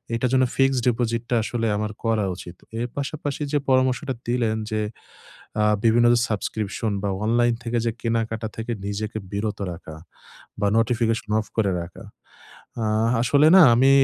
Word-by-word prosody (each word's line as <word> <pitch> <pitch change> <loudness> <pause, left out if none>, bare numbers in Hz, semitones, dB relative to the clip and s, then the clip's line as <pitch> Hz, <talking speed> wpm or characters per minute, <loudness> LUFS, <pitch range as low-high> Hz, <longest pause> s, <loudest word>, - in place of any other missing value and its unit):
এটার 125 +2 0
জন্য 130 0 +4
fixed 135 -1 +3
deposit 115 -1 0
টা 120 - +2
আসলে 115 +1 -2
আমার 105 0 -2
করা 110 -3 +1
উচিত। 90 0 -10 0.2
এর 120 - -1
পাশাপাশি 145 0 -4
যে - - +4
পরামর্শটা 130 +1 +2
দিলেন 120 -2 0
যে, 110 - 0 0.8
আ - - +3 0.2
বিভিন্ন 115 +1 +4
যে 120 - +3
সাবস্ক্রিপশন 105 0 -2
বা 100 - 0 0.2
অনলাইন 120 +1 +3
থেকে 120 0 -1
যে 115 - +1
কেনাকাটা 115 -1 -1
থেকে 115 +2 -4 0.2
নিজেকে 110 +2 -3 0.2
বিরত 105 +1 -2
রাখা, 80 -2 -9 0.7
বা 105 - +2
নোটিফিকেশন 115 -1 0
অফ 110 - -8
করে 105 -3 +2
রাখা। 85 +1 -11 0.8
আ - - 0 0.4
আসলে 140 +5 +4
না 190 - +9
আমি 130 +3 +5
115 Hz, 160 wpm, -23 LUFS, 110-125 Hz, 0.8 s, না